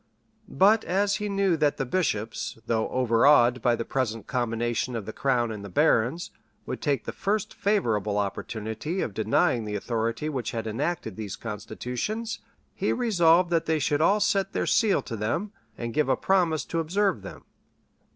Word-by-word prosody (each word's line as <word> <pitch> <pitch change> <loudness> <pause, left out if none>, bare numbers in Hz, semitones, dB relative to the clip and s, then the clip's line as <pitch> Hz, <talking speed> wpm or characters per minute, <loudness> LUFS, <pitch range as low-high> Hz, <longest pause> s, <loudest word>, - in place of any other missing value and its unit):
But 210 +3 +4
as 200 +3 +1
he 210 -1 -3
knew 195 -3 +2
that 150 -2 +1
the 135 - -1
bishops, 115 - -2
though 110 -1 0
overawed 125 +1 +4
by 120 -2 +3
the 115 - -4
present 115 -5 -2
combination 120 0 -1
of 110 -4 -4
the 110 - -6
crown 120 -4 +1
and 105 -2 -6
the 100 - -7
barons, 120 - +2 0.3
would - - -5
take 145 -3 0
the - - -3
first 205 +1 -2
favorable 110 - 0
opportunity 110 - -3
of 105 - -3
denying 110 +2 +1
the 105 -1 -4
authority 115 +5 -2
which 125 -7 -3
had 115 -1 -3
enacted 115 - -3
these 105 -3 -5
constitutions, 125 - -4 0.3
he - - -1
resolved 175 -7 +3
that 165 -2 +1
they 160 0 +2
should 145 0 0
all 200 +6 +4
set 200 -1 +1
their - - 0
seal 220 -4 +2
to 115 - -5
them, 120 - -2 0.3
and 115 -1 -4
give 150 -2 +1
a - - +3
promise 175 -5 +1
to 165 - -2
observe 180 - 0
them. 95 - -10
130 Hz, 170 wpm, -26 LUFS, 115-180 Hz, 0.3 s, But